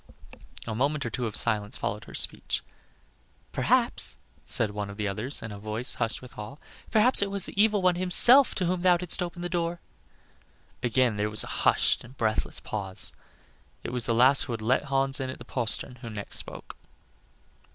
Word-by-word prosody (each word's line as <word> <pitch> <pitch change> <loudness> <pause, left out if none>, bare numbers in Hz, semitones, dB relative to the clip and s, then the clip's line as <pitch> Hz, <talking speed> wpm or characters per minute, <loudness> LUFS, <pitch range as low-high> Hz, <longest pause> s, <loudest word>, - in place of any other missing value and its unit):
A 115 - -4
moment 140 +4 0
or 120 - -3
two 120 +2 -2
of 105 - -6
silence 105 -3 -1
followed 105 +1 -4
her - - -11
speech. - - +3 0.9
"Perhaps," - - +2 0.3
said 110 -3 +2
one 105 -1 -4
of 100 - -9
the 105 -1 -2
others, 110 +8 -2
in 110 - -6
a 100 - -8
voice 110 +4 -4
hushed 115 +1 -3
with 125 -4 -12
awe, 105 +6 -7 0.3
"perhaps 225 +2 +5
it 200 - 0
was 200 -1 +1
the 200 - 0
evil 210 -3 +2
one 180 -1 +3
himself 235 +9 +6
to 185 - -1
whom 180 +1 -1
thou 180 -1 +4
didst 180 +1 -1
open 175 0 -4
the - - -1
door." 170 -1 -2 1.0
Again 120 -2 +1
there 105 +1 0
was 105 -2 +3
a - - -5
hushed - - +1
and 130 +3 -15
breathless 110 -1 -1
pause; 95 -2 -5 0.7
it - - -5
was 125 -2 +2
the 115 - +1
lass 130 +4 +5
who 120 - -3
had 115 - -5
let 130 +5 +1
Hans 135 0 +1
in 130 -1 -3
at - - -6
the - - -12
postern, 125 0 -2
who 115 - -9
next 105 -2 -6
spoke. - - -9
125 Hz, 195 wpm, -27 LUFS, 110-175 Hz, 1.0 s, himself